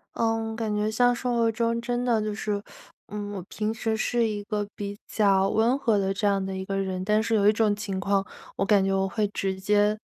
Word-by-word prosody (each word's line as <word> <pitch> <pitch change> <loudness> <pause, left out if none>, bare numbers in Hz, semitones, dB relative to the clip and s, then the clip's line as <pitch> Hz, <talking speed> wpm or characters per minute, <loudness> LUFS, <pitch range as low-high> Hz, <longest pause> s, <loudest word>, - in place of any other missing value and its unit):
嗯， 225 -1 0
感 220 -2 -2
觉 210 +1 0
像 245 +3 +3
生 245 0 -2
活 230 -1 +3
中 230 +1 0
真 245 +1 -2
的 235 -3 +2
就 215 0 -2
是， 205 0 -2 0.5
嗯， 205 0 -5
我 190 -3 -5
平 215 +1 -2
时 225 -1 -1
是 230 +1 +1
一 210 -1 -3
个 210 -1 -2
比 200 0 -5
较 195 -2 +3
温 230 +5 +2
和 230 -6 +2
的 195 -1 0
这 205 +2 -2
样 200 -1 +2
的 190 0 -4
一 190 0 -4
个 195 0 -2
人， 190 -1 -2
但 210 +2 +2
是 225 0 0
有 205 -1 +3
一 210 - +6
种 215 -1 +2
情 200 -2 -4
况 195 0 +1 0.3
我 - - 0
感 200 -1 +4
觉 195 - +1
我 195 0 +1
会 210 +2 0
直 195 -1 -3
接 205 +2 +2
210 Hz, 255 characters per minute, -26 LUFS, 195-225 Hz, 0.5 s, 一